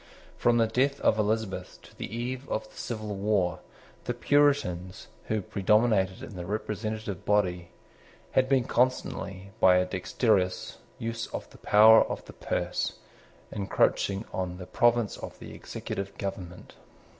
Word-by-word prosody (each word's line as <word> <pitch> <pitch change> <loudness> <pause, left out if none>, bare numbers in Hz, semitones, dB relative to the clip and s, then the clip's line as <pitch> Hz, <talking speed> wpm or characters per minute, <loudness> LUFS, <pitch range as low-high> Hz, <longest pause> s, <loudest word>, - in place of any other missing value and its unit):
From 120 0 +3
the 115 - +4
death 135 +5 +1
of 110 - +3
Elizabeth 105 -2 -2
to - - -16
the - - -5
eve 125 +3 -4
of 110 - -2
the - - -20
civil 110 -3 -4
war, 100 -3 0 0.5
the 120 - -2
Puritans, 120 -11 +1 0.2
who 110 -2 -1
predominated 100 -1 +2
in 110 - -9
the 90 -1 -6
representative 105 -1 -4
body, 90 -4 +1 0.6
had 130 0 +2
been 135 -2 +4
constantly, 100 -7 -1
by 90 -1 +6
a 90 - +3
dexterous 95 0 0 0.2
use 115 0 -4
of - - -6
the - - -16
power 110 +2 +7
of - - -5
the - - -11
purse, - - -2 0.6
encroaching 100 0 +1
on 90 -1 -3
the 90 - -8
province 120 +1 +2
of - - -8
the - - -10
executive 100 0 -6
government. 90 -3 -6
105 Hz, 145 wpm, -28 LUFS, 95-115 Hz, 0.6 s, power